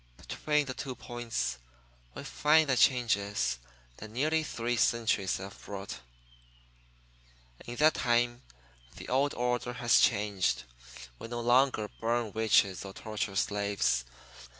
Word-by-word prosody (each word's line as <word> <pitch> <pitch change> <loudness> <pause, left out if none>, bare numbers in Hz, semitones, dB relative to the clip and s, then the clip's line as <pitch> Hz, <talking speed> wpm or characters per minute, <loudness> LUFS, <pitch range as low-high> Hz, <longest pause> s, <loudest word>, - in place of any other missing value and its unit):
Between 150 -1 -1
the 130 - -4
two 130 0 -6
points 115 - -4 0.6
we - - -7
find 155 +1 +3
the 130 - +2
changes 105 - +2 0.4
that 110 - -9
nearly 155 +8 +1
three 120 -5 -2
centuries 110 -6 +1
have 95 +1 -10
brought. 95 -9 -7 1.7
In 120 - -5
that 155 +4 +4
time 120 -1 +1 0.5
the - - -9
old 140 +3 +1
order 125 0 -1
has 120 -1 +3
changed. 100 -3 +1 0.6
We - - -7
no 120 0 -4
longer 120 -2 +3
burn 115 -1 0
witches 105 -3 +2
or 95 -1 -8
torture 105 -2 -4
slaves. 100 - 0
120 Hz, 125 wpm, -30 LUFS, 100-125 Hz, 1.7 s, that